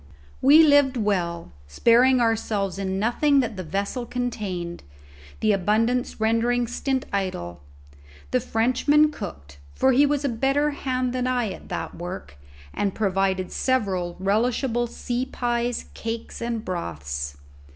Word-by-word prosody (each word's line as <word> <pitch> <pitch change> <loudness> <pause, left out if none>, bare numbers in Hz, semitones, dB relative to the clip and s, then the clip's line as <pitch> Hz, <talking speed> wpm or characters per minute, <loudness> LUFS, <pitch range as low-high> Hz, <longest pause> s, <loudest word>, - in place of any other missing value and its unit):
We 295 +5 +8
lived 285 -3 +5
well, 180 -6 -1 0.2
sparing 240 - +4
ourselves 215 -4 0
in 190 -1 -2
nothing 275 +7 +2
that 230 -4 -3
the 185 - -5
vessel 200 - -3
contained, 200 -9 -4 0.6
the 215 - +3
abundance 220 +7 +1
rendering 230 +2 +2
stint 260 +2 -2
idle; 85 - -3 0.7
the - - +3
Frenchman 260 +7 +2
cooked, 75 - -9 0.2
for 265 - +3
he 280 +3 +5
was 290 0 0
a - - +2
better 275 +5 +1
hand 255 -3 -2
than 255 0 -1
I 245 -5 0
at - - -10
that - - -4
work, 175 - -8 0.3
and 200 -2 -1
provided 190 -2 0
several 195 -9 0
relishable 240 +4 +1
sea 245 +2 -3
pies, 240 -1 -2
cakes, 230 0 -5
and 235 -1 -3
broths. 70 - -4
225 Hz, 130 wpm, -24 LUFS, 190-255 Hz, 0.7 s, We